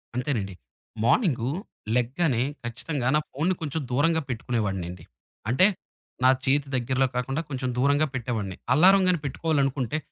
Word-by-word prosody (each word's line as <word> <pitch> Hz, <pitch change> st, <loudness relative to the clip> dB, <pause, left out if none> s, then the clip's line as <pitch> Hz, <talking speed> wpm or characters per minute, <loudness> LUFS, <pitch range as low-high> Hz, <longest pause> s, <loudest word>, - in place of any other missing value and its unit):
అంతేనండి. 120 Hz, -7 st, -2 dB, 0.5 s
మార్నింగు 130 Hz, -, +2 dB, 0.5 s
లెగ్గానే 125 Hz, +1 st, +1 dB, 0.2 s
ఖచ్చితంగా 120 Hz, +3 st, -2 dB
నా -, -, +5 dB
ఫోనుని 170 Hz, +7 st, 0 dB
కొంచెం 155 Hz, 0 st, -2 dB
దూరంగా 160 Hz, +5 st, +2 dB
పెట్టుకునేవాడినండి. 95 Hz, -8 st, -3 dB, 0.5 s
అంటే 140 Hz, +10 st, +5 dB, 0.6 s
నా 130 Hz, -, +7 dB, 0.2 s
చేతి 140 Hz, +1 st, +2 dB
దగ్గరలో 130 Hz, +2 st, +1 dB
కాకుండా, 135 Hz, +4 st, -1 dB
కొంచెం 130 Hz, -2 st, -2 dB
దూరంగా 145 Hz, +4 st, +3 dB
పెట్టేవాడిని. 110 Hz, -7 st, -3 dB, 0.2 s
అల్లారం 190 Hz, +7 st, +6 dB
గాని 180 Hz, -2 st, +3 dB
పెట్టుకోవాలనుకుంటే, 140 Hz, -3 st, 0 dB
130 Hz, 120 wpm, -26 LUFS, 120-150 Hz, 0.6 s, నా